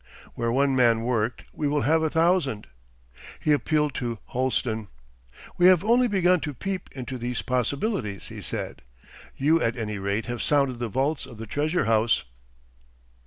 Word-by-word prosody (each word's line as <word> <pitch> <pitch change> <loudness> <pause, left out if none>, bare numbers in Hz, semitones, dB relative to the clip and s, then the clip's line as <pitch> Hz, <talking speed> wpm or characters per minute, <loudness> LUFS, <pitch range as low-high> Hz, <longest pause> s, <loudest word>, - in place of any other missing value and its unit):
'Where 115 -1 -1
one 135 +2 +2
man 115 -3 +4
worked 115 -1 -1
we 150 - -1
will 145 0 +1
have 160 +6 +3
a 160 - +1
thousand.' 160 - +1 0.7
He 155 - +1
appealed 150 +1 +2
to 120 -2 -3
Holsten. 120 -4 -1 0.7
'We 175 - +7
have 185 -2 +6
only 240 +3 +4
begun 185 -4 +3
to 150 -3 -5
peep 190 +6 -4
into 130 -1 -6
these 120 0 -3
possibilities,' 125 - -2
he - - -8
said. - - -5 0.6
'You 160 +4 +3
at 115 +1 0
any 105 -3 -3
rate 100 +3 -1
have 120 -2 -4
sounded 140 -4 +1
the 120 -2 -2
vaults 135 +4 -1
of 120 -4 -12
the 115 - -6
treasure 150 - 0
house. 115 +1 +2
130 Hz, 165 wpm, -25 LUFS, 115-155 Hz, 0.7 s, We